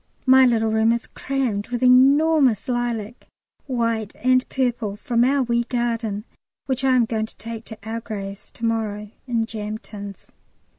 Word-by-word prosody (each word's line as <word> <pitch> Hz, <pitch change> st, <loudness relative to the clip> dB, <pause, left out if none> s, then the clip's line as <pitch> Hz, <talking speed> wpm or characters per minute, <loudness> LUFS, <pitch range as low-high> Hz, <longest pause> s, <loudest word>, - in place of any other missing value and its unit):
My 260 Hz, 0 st, +7 dB
little 225 Hz, -2 st, +1 dB
room 220 Hz, +1 st, +3 dB
is 235 Hz, +1 st, -3 dB
crammed 255 Hz, -7 st, -2 dB
with 245 Hz, 0 st, -3 dB
enormous 270 Hz, -1 st, +5 dB
lilac, 240 Hz, -2 st, -3 dB, 0.4 s
white 230 Hz, -4 st, -1 dB
and 255 Hz, +2 st, +3 dB
purple, 245 Hz, -6 st, -1 dB
from 235 Hz, +2 st, +1 dB
our 270 Hz, +2 st, +3 dB
wee 235 Hz, -1 st, +1 dB
garden, 230 Hz, -4 st, -2 dB, 0.4 s
which 265 Hz, 0 st, -1 dB
I 260 Hz, -1 st, +4 dB
am 245 Hz, -2 st, +4 dB
going 220 Hz, -1 st, -2 dB
to -, -, -17 dB
take 225 Hz, 0 st, -7 dB
to 220 Hz, -, -9 dB
our 225 Hz, +1 st, -4 dB
graves 200 Hz, -3 st, -7 dB
to 230 Hz, -, -5 dB
morrow 210 Hz, -2 st, -2 dB, 0.2 s
in 230 Hz, -2 st, 0 dB
jam 215 Hz, -1 st, -5 dB
tins. 200 Hz, -3 st, -10 dB
230 Hz, 160 wpm, -22 LUFS, 220-250 Hz, 0.4 s, My